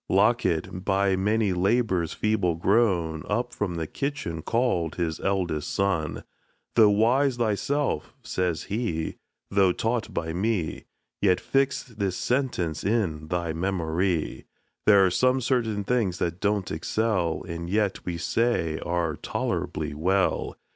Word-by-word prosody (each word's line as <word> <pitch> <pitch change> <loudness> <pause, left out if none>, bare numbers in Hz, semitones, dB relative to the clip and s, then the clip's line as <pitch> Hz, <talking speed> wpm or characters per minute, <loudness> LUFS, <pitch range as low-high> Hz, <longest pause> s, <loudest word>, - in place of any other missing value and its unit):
Locket, 95 -4 +2
by 95 -1 +2
many 105 +1 +1
labors 95 -2 +1
feeble 100 -6 +1
grown, 85 -4 +2
Up 120 +4 -1
from 95 -4 -2
the 80 -1 -2
kitchen 135 - -3
call'd 105 -7 0
his 80 -3 -2
eldest 90 -6 -1
son; 95 -6 -1 0.5
Though 110 -3 +6
wise 120 +6 +3
thyself 120 - 0
(says 90 -2 -1
he), 100 -7 -2 0.3
though 100 -2 +4
taught 115 +3 -1
by 80 -4 -3
me, 95 -3 -1 0.4
Yet 95 -3 +4
fix 135 0 +1
this 100 -6 -3
sentence 120 - -1
in 90 -8 0
thy 85 -1 -1
memory: 85 -1 -1 0.4
There 100 -2 +7
are 95 - +2
some 130 +7 +3
certain 115 -5 0
things 105 -5 0
that 85 0 -2
don't 100 -2 0
excel, 90 0 0
And 85 0 -5
yet 105 0 0
we 85 -2 -3
say 85 -5 0
are 85 -3 -1
tolerably 75 -1 -2
well. 95 +6 0
95 Hz, 130 wpm, -26 LUFS, 85-110 Hz, 0.5 s, There